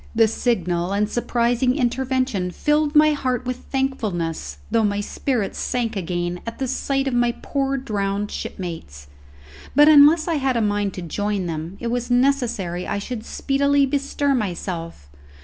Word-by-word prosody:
This 225 -1 +4
signal 180 -6 0
and 210 +1 +1
surprising 240 +2 +1
intervention 255 -6 0
filled 295 - 0
my 305 0 +6
heart 255 -4 -1
with 250 0 -2
thankfulness, 195 - -3
though 225 - +3
my 205 -1 +1
spirits 220 +1 -2
sank 235 -3 -1
again 175 -1 -2
at 230 - -5
the 265 - -2
sight 270 +1 -1
of 265 - -1
my 240 0 +2
poor 275 -1 -1
drowned 205 -5 -2
shipmates. 160 - -6 0.7
But, 295 +2 +7
unless 310 +2 +7
I 330 -2 +1
had 265 -3 0
a - - +2
mind 205 -2 0
to 180 - -6
join 205 +3 -2
them, 165 +3 -5
it 235 -1 -3
was 245 0 -2
necessary 245 -9 +1
I - - -1
should 220 +2 -5
speedily 280 +2 +1
bestir 280 +1 0
myself. 175 - -4
235 Hz, 155 wpm, -22 LUFS, 195-270 Hz, 0.7 s, But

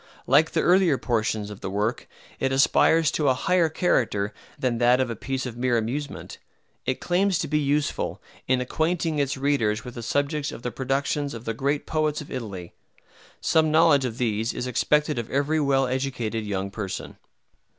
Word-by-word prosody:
Like 150 +5 +4
the - - +2
earlier 180 -5 +4
portions 110 -4 -1
of 105 - -9
the - - -4
work, 105 +5 -2 0.3
it 135 - 0
aspires 150 +3 +4
to 150 -3 +1
a 130 - +3
higher 175 +3 +2
character 115 - 0 0.2
than 120 -3 -1
that 125 +1 +4
of 130 -2 0
a - - -4
piece 130 +4 -3
of 125 -2 -5
mere 120 0 +1
amusement. 135 +6 -4 0.5
It 130 - 0
claims 185 +1 +1
to - - -2
be 150 - +1
useful, 145 0 -1 0.3
in 130 0 +2
acquainting 160 +3 -1
its 140 0 0
readers 125 -6 0
with 125 - -7
the 120 - -7
subjects 145 +5 -1
of 120 - -9
the 125 - -2
productions 135 +2 -1
of 115 +1 -9
the 115 - -1
great 140 +5 -1
poets 155 -1 0
of 150 - -9
Italy. 100 -9 -6 0.7
Some 160 -1 +3
knowledge 155 -3 +5
of 120 -3 -3
these 115 -2 0
is - - -4
expected 150 +3 +1
of 115 - -5
every 145 +3 +1
well 135 -2 +2
educated 125 -4 -2
young 100 -1 -2
person. 100 -2 -5
130 Hz, 180 wpm, -25 LUFS, 115-150 Hz, 0.7 s, knowledge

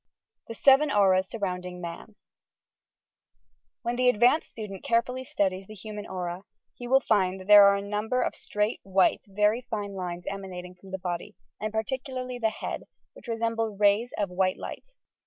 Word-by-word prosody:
THE 230 - -7
SEVEN 275 +4 +5
AURAS 190 -4 +3
SURHOUNDINO 180 -4 -4
MAN 175 +5 -8 1.7
When 240 +1 -1
the 250 0 +4
advanced 245 +7 +3
student 205 -4 -8
carefully 245 +2 0
studies 190 -5 -1
the 215 - -10
hu 215 +3 -8
man 210 -1 -6
aura, 180 -1 -4 0.3
he 245 - -8
will 265 +2 +5
find 190 -5 +1
that 185 - -10
there 205 0 +9
are 200 - +5
a 200 - -3
number 215 +5 -1
of - - -1
straight, 210 +2 -2
white, 190 -1 +2
very 210 +4 +2
fine 210 -5 -4
lines 180 -2 -5
emanating 185 -2 -6
from 180 +2 -16
the 190 - -4
body, 180 +3 -5 0.2
and 215 0 -3
particularly 255 +2 -3
the 225 -2 +2
head, 220 - -5 0.3
which - - -15
resemble 225 -2 -1
rays 205 +4 +3
of 200 -3 -1
white 185 0 +1
light. - - -7
210 Hz, 170 wpm, -27 LUFS, 190-230 Hz, 1.7 s, there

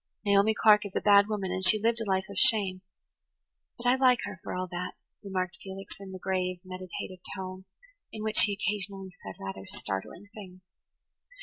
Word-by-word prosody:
[Page 205 - 0
99] - - +5
"Naomi 200 +2 +5
Clark 210 -1 +6
is 195 - -15
a - - +2
bad 200 -1 +6
woman 200 -4 -2
and 185 0 -2
she 215 +3 +6
lived 230 +2 +1
a 215 - -3
life 190 0 +1
of 200 - -9
shame, 190 -2 +4 1.0
but 240 - -11
I 245 - +5
like 255 -2 +5
her, 205 -2 -6
for - - -5
all 185 0 -2
that," 180 +1 -4 0.3
remarked 185 -3 -3
Felix, 195 0 -8
in 195 -1 -9
the 190 - -6
grave, 185 -1 -2
meditative 185 0 -7 0.2
tone 185 0 -7 0.5
in 215 - -6
which 215 0 +1
he 210 -2 +4
occasionally 200 -1 -3
said 95 - -7
rather 95 0 -7
startling 100 - -4
things. 185 -4 -11
195 Hz, 195 wpm, -29 LUFS, 185-210 Hz, 1.0 s, Clark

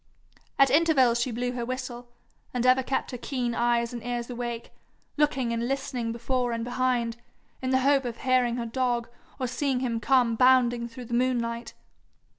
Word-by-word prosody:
At 275 -2 +5
intervals 270 -6 +4
she 255 - 0
blew 245 +1 -2
her 245 -1 -4
whistle, 245 -1 -5 0.5
and 245 0 0
ever 255 +1 +5
kept 265 +1 -2
her 250 - -6
keen 245 -2 -2
eyes 235 0 +1
and 235 -2 -6
ears 240 0 -3
awake, 240 -1 -5 0.4
looking 270 -5 +1
and 230 +1 -1
listening 255 -3 -2
before 240 +1 -1
and 230 0 -2
behind, 245 -1 0 0.4
in 260 - -2
the 260 0 +3
hope 275 0 +3
of 235 -1 -4
hearing 255 -2 +2
her 240 -1 -3
dog, 240 0 -1 0.3
or 260 - -1
seeing 255 +1 -1
him 235 -3 -1
come 245 -2 +3
bounding 245 -1 +4
through 240 +1 -9
the 235 - -7
moonlight. 235 -1 -1
245 Hz, 175 wpm, -27 LUFS, 235-255 Hz, 0.5 s, At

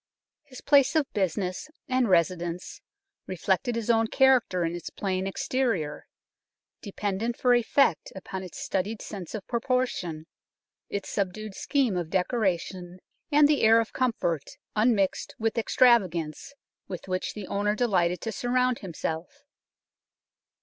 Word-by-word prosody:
His 255 -2 -13
place 280 +1 +4
of 305 -3 +1
business 185 - -2 0.2
and 255 -4 +1
residence 175 0 0 0.5
reflected 190 +5 0
his 230 0 +1
own 225 -1 +3
character 245 -9 +3
in 165 +1 -2
its 175 - -6
plain 190 -1 -2
exterior, 195 - -1 0.7
dependent 205 +3 -3
for 250 -1 +3
effect 240 - +2
upon 190 0 -6
its 185 -2 -9
studied 205 +3 -2
sense 195 -1 -7
of 205 - -6
proportion, 235 -10 -1 0.6
its 200 -1 -4
subdued 205 +1 -3
scheme 260 -2 0
of 175 -2 -2
decora 190 0 +1
tion, 180 0 -9 0.3
and 295 0 +6
the 295 -1 +2
air 225 +1 +6
of 225 - -2
comfort 175 - -1 0.2
unmixed 215 -3 +1
with 225 +1 -1
ex 225 - -3
travagance 185 - +3 0.3
with 180 -1 -7
which 185 0 -2
the 210 -2 -6
owner 205 +2 0
delighted 180 -7 +1
to 225 - -3
surround 250 +2 0
himself. 175 - -5
205 Hz, 135 wpm, -27 LUFS, 180-245 Hz, 0.7 s, and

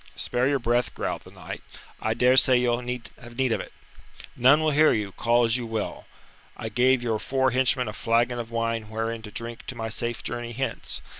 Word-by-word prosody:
"Spare 125 +1 0
your 140 0 +2
breath," 120 -3 0
growled - - -3
the - - -12
knight. - - -8 0.4
"I 110 0 0
dare 125 +2 +4
swear 130 -1 +6
you'll 120 -1 +2
have 125 -1 -7
need 130 -2 +2
of - - +1
it. - - -10 0.6
None 130 +5 +6
will 155 -1 +2
hear 155 +2 +5
you, 105 -2 -2
call 120 +4 +2
as 115 +1 +3
you 120 -2 -4
will. 110 -1 -4 0.5
I 110 - -4
gave 125 +3 +3
your 110 -3 0
four 130 +2 +1
henchmen 130 -1 +2
a 105 - -4
flagon 120 +4 +1
of 115 -1 -5
wine 115 -2 -2
wherein 115 +1 -3
to 110 - -9
drink 115 +2 -7
to 130 - -5
my 115 -1 -4
safe 120 +1 -2
journey 120 0 -4
hence. 130 0 -4
120 Hz, 210 wpm, -26 LUFS, 115-125 Hz, 0.6 s, swear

